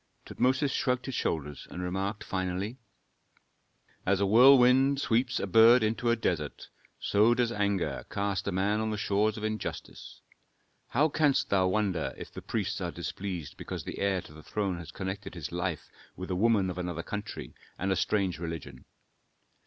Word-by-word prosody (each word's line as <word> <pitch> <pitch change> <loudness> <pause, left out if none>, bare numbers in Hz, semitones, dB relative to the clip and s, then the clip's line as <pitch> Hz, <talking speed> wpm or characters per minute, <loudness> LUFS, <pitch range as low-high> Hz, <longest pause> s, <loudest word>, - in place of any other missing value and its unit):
Tutmosis 130 +3 +1
shrugged 125 -1 0
his 135 - -4
shoulders, 75 - -3
and - - -7
remarked 95 +4 -2
finally, 95 +5 -3 1.2
"As 95 0 +2
a 100 - +2
whirlwind 130 +4 +6
sweeps 120 -1 +1
a - - -1
bird 115 +5 +6
into 115 +2 0
a 115 - +4
desert, 85 -10 -3 0.3
so 110 +4 +3
does 120 -1 +1
anger 100 -4 -1
cast 100 -1 -2
a - - +1
man 100 +3 +1
on 110 0 -1
the 105 - -2
shores 105 +1 +1
of 105 - -6
injustice. 110 0 -5 0.7
How 145 +6 +3
canst 140 -3 +1
thou 95 -2 +3
wonder 95 -4 0
if - - -9
the - - -7
priests - - -2
are - - -1
displeased 90 -6 -5
because - - -6
the - - -6
heir 100 -2 +1
to - - -14
the 80 - -12
throne 95 +1 -2
has 85 -2 -9
connected 95 0 -5
his 80 -4 -6
life 85 -2 -3 0.2
with 95 +1 -6
a - - 0
woman 100 -2 +3
of 90 - -6
another 90 -2 -3
country 105 - -6 0.2
and 95 +2 -1
a - - +3
strange 95 -3 0
religion? 80 -6 -6
100 Hz, 170 wpm, -29 LUFS, 90-115 Hz, 1.2 s, whirlwind